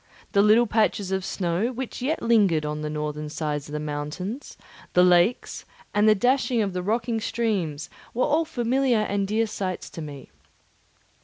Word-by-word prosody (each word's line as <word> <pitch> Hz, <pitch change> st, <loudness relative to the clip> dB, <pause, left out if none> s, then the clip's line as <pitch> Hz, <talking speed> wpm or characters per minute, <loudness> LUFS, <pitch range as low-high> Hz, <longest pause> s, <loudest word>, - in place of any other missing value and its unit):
The 200 Hz, -, +4 dB
little 215 Hz, +3 st, +5 dB
patches 210 Hz, -3 st, +1 dB
of 190 Hz, 0 st, -1 dB
snow 185 Hz, +5 st, -1 dB
which 255 Hz, 0 st, -6 dB
yet 300 Hz, +6 st, -1 dB
lingered 200 Hz, -10 st, +3 dB
on 150 Hz, 0 st, -3 dB
the 150 Hz, -, -3 dB
northern 150 Hz, 0 st, -4 dB
sides 150 Hz, -2 st, -3 dB
of -, -, -9 dB
the 150 Hz, -, -2 dB
mountains, 150 Hz, -, -5 dB, 0.4 s
the 180 Hz, -, +6 dB
lakes, 180 Hz, +6 st, +3 dB, 0.3 s
and 210 Hz, +1 st, +4 dB
the 215 Hz, -, +6 dB
dashing 245 Hz, +1 st, +2 dB
of 195 Hz, -2 st, -3 dB
the 180 Hz, -, -2 dB
rocky 225 Hz, +4 st, -1 dB
streams 205 Hz, -10 st, -2 dB, 0.2 s
were 250 Hz, -, +1 dB
all 310 Hz, +2 st, +2 dB
familiar 245 Hz, -3 st, +1 dB
and 200 Hz, -2 st, -1 dB
dear 220 Hz, +3 st, +1 dB
sights 190 Hz, -4 st, -4 dB
to 165 Hz, -, -7 dB
me. 145 Hz, -3 st, -9 dB
200 Hz, 170 wpm, -25 LUFS, 160-230 Hz, 0.4 s, the